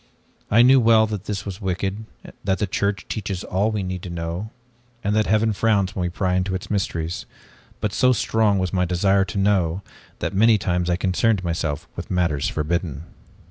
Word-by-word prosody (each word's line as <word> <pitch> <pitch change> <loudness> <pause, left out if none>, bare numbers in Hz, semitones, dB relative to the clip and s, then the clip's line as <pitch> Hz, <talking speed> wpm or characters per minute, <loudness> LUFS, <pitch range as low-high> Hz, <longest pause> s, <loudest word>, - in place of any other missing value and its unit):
I 115 +3 +6
knew 130 +2 +7
well 115 -2 +5
that 105 -2 -5
this 100 -1 -4
was 100 +1 -6
wicked, 95 +3 -2 0.4
that 95 -1 +1
the 105 - 0
Church 100 0 -2
teaches 95 -3 -4
all 100 +4 0
we 105 -3 -2
need 90 -1 -4
to 90 - -7
know 85 +4 -4 0.5
and 105 +1 0
that 110 0 +2
heaven 110 +2 +2
frowns 100 -1 +1
when 95 - -2
we 90 - 0
pry 90 +1 -1
into 95 +1 0
its 95 - -6
mysteries, 85 -5 -2 0.5
but 105 -1 -2
so 130 - +4
strong 110 -3 +2
was 95 -2 -1
my 90 -1 +2
desire 95 +2 +2
to 100 - -6
know, 95 -2 +1 0.3
that - - -3
many 110 +3 +5
times 90 -3 -1
I 90 - +2
concerned 95 +3 +1
myself 80 -3 -2
with - - -7
matters 85 -6 0
forbidden. 80 -1 -2
95 Hz, 190 wpm, -22 LUFS, 90-105 Hz, 0.5 s, knew